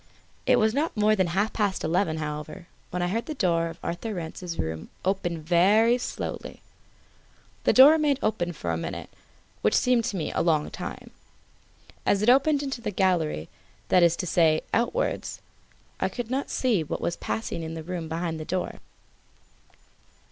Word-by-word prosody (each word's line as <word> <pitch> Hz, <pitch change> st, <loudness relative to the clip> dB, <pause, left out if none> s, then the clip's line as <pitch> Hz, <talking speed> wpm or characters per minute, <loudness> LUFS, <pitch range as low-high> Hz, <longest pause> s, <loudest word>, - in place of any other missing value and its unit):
It -, -, +6 dB
was 220 Hz, 0 st, +3 dB
not 295 Hz, -1 st, -1 dB
more 215 Hz, +1 st, +4 dB
than 185 Hz, -3 st, +2 dB
half 195 Hz, +5 st, 0 dB
past 205 Hz, -3 st, 0 dB
eleven, 165 Hz, 0 st, +1 dB
however, 150 Hz, +3 st, -5 dB, 0.2 s
when 180 Hz, 0 st, -2 dB
I -, -, +1 dB
heard 225 Hz, +6 st, -2 dB
the 310 Hz, -, -4 dB
door 170 Hz, -7 st, +1 dB
of 165 Hz, -, -8 dB
Arthur 210 Hz, +5 st, -3 dB
Rance's 170 Hz, 0 st, -6 dB
room 80 Hz, 0 st, -4 dB, 0.2 s
open 175 Hz, -4 st, -1 dB
very 205 Hz, +9 st, +4 dB
slowly. -, -, -5 dB, 1.0 s
The -, -, +5 dB
door 270 Hz, +3 st, +9 dB
remained 300 Hz, -3 st, +2 dB
open 190 Hz, -5 st, 0 dB
for 85 Hz, -, -3 dB
a 80 Hz, -, -1 dB
minute, -, -, -6 dB, 0.5 s
which 105 Hz, -, +2 dB
seemed 250 Hz, -2 st, +3 dB
to -, -, -2 dB
me 160 Hz, -, -2 dB
a -, -, 0 dB
long 160 Hz, -3 st, +1 dB
time. -, -, -7 dB, 0.9 s
As 200 Hz, +1 st, +2 dB
it 240 Hz, -, +6 dB
opened 280 Hz, +2 st, +3 dB
into 270 Hz, -3 st, -4 dB
the 220 Hz, -, -2 dB
gallery, 180 Hz, -, 0 dB, 0.4 s
that 180 Hz, -, +5 dB
is 170 Hz, -1 st, +5 dB
to 180 Hz, -, -4 dB
say, 160 Hz, -3 st, +3 dB
outwards, 325 Hz, -, -1 dB, 0.6 s
I -, -, +1 dB
could 245 Hz, -1 st, -5 dB
not 270 Hz, +2 st, -1 dB
see 230 Hz, -10 st, +1 dB
what 150 Hz, -, -4 dB
was 170 Hz, -, -1 dB
passing 195 Hz, -6 st, -3 dB
in 160 Hz, 0 st, -5 dB
the 160 Hz, -, -6 dB
room 170 Hz, -1 st, -5 dB
behind 165 Hz, 0 st, -3 dB
the -, -, -4 dB
door. 180 Hz, +3 st, -3 dB
180 Hz, 175 wpm, -26 LUFS, 165-225 Hz, 1.0 s, door